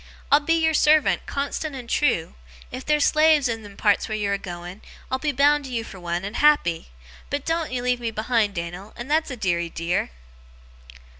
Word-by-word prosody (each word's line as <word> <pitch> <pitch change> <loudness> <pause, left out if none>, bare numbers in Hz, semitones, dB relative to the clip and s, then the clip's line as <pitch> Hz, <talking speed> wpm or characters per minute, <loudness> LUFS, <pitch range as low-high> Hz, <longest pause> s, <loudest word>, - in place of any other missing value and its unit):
I'll 285 - +7
be 330 +3 +1
your 320 -1 +2
servant, 305 0 +3
constant 280 +1 -3
and 250 -3 -8
trew. 180 - +1 0.4
If 255 +1 -6
there's 300 -1 +2
slaves 305 -2 +4
in 225 -1 -3
them 205 -2 -13
parts 205 0 +2
where 215 - -2
you're 200 -1 -1
a 200 - -1
going, 175 +1 -8 0.3
I'll 260 - 0
be 295 +1 0
bound 290 +1 +3
to 260 - -8
you 230 -2 -2
for 195 - -11
one, 175 +1 -3
and 205 +3 -5
happy, 290 - +3 0.4
but 285 0 -3
doen't 330 -2 -1
ye 250 -1 -2
leave 250 0 +1
me 235 -1 -2
behind, 220 -2 0
Dan'l, 175 +4 -6
that's 300 +6 0
a 255 - -5
deary 175 -5 -1
dear! 170 +2 -2
245 Hz, 200 wpm, -23 LUFS, 195-295 Hz, 0.4 s, I'll